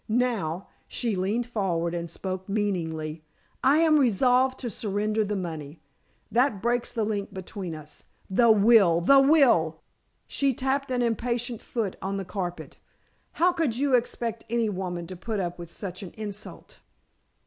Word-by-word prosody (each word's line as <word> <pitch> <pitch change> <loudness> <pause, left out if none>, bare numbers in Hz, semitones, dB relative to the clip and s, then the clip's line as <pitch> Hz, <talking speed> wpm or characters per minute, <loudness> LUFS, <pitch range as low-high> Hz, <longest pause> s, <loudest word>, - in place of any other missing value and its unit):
Now," 215 -8 0 0.2
she 230 -4 -2
leaned 205 +6 0
forward 180 -8 -1
and 170 -1 -3
spoke 185 +2 -5
meaningly, 165 -7 -2 0.4
"I 275 +3 +5
am 310 -2 +5
resolved 255 +2 +3
to 245 - -3
surrender 210 +1 -1
the 210 0 -2
money. 160 -5 -5 0.5
That 240 -3 +2
breaks 240 +3 0
the 225 - -1
link 205 -2 -3
between 185 -2 -6
us. 150 -1 -12 0.2
The 230 +5 +4
will! 205 -5 +6
the 275 +10 +6
will!" 255 - +4 0.4
she 275 -3 0
tapped 270 +2 -1
an 250 -1 +1
impatient 235 0 -1
foot 220 -6 -3
on 195 +1 -2
the 195 - -4
carpet. 180 -1 -5 0.6
"How 355 +2 +3
could 310 -10 0
you 275 0 +1
expect 235 -2 0
any 230 -1 +1
woman 180 -3 -4
to 185 +2 -8
put 215 +4 -3
up 175 -1 -3
with 170 -1 -8
such 185 +1 -7
an 190 - -8
insult?" 210 0 -6
210 Hz, 155 wpm, -26 LUFS, 180-245 Hz, 0.6 s, will